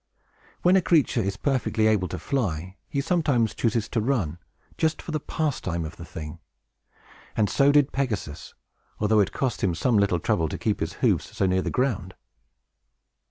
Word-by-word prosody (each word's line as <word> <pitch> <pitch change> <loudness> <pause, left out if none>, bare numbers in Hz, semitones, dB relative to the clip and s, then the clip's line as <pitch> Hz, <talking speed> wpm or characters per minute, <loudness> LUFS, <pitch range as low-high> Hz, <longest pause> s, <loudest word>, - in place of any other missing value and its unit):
When 180 +2 +5
a 190 - +5
creature 155 -8 +3
is 100 -1 -2
perfectly 130 -5 0
able 105 -4 +3
to - - -5
fly, 95 - -2
he 140 - 0
sometimes 145 - +1
chooses 115 -1 0
to 115 - 0
run, 105 - -1 0.4
just 160 -1 0
for - - -7
the 155 - -1
pastime 130 - -2
of 80 - -8
the 85 - -8
thing; 75 0 -8 1.0
and 105 -2 +3
so 140 +7 +4
did 145 -1 +4
Pegasus, 110 - -3 0.4
although 105 +1 +3
it 100 -1 +2
cost 130 -4 -2
him 90 -4 +2
some 115 +4 +2
little 100 -4 +2
trouble 80 0 0
to - - -4
keep - - -1
his - - -2
hoofs - - +1
so - - +2
near 95 0 +2
the - - -2
ground. 115 -8 -1
110 Hz, 175 wpm, -25 LUFS, 90-140 Hz, 1.0 s, When